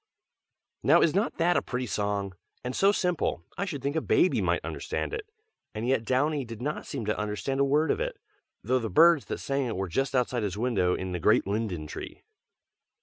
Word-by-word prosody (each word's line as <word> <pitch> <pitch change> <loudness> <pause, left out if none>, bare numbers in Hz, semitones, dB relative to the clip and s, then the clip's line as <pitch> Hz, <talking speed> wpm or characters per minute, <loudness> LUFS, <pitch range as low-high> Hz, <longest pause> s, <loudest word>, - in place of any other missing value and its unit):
NOW - - +5
is 160 - +3
not 200 +6 0
that 175 +1 +3
a - - +2
pretty 125 0 -3
song? 100 -3 -2 0.3
and 125 +1 -4
so 195 +1 +5
simple, 180 - -1
I 200 - -2
should 145 -9 -5
think 140 +2 -1
a 160 - +1
baby 180 - +3
might - - 0
understand - - -3
it. 440 -1 -5 0.5
And 110 +3 -3
yet 125 -3 +1
Downy 140 +4 +1
did 115 -3 -8
not 150 +5 -3
seem 115 - -4
to 105 - -1
understand 105 +5 -2
a - - +5
word 145 +3 +2
of - - -1
it, - - -3 0.5
though 130 +1 +2
the 115 -2 -3
birds 165 - +5
that - - -4
sang 135 -1 -1
it 115 - -3
were 95 +1 -2
just 135 +10 -1
outside 125 -1 +1
his 100 -2 -2
window 105 -7 +1
in 95 0 -4
the 90 - -2
great - - +3
linden 100 -6 -2
tree. - - -8
125 Hz, 210 wpm, -28 LUFS, 105-150 Hz, 0.5 s, NOW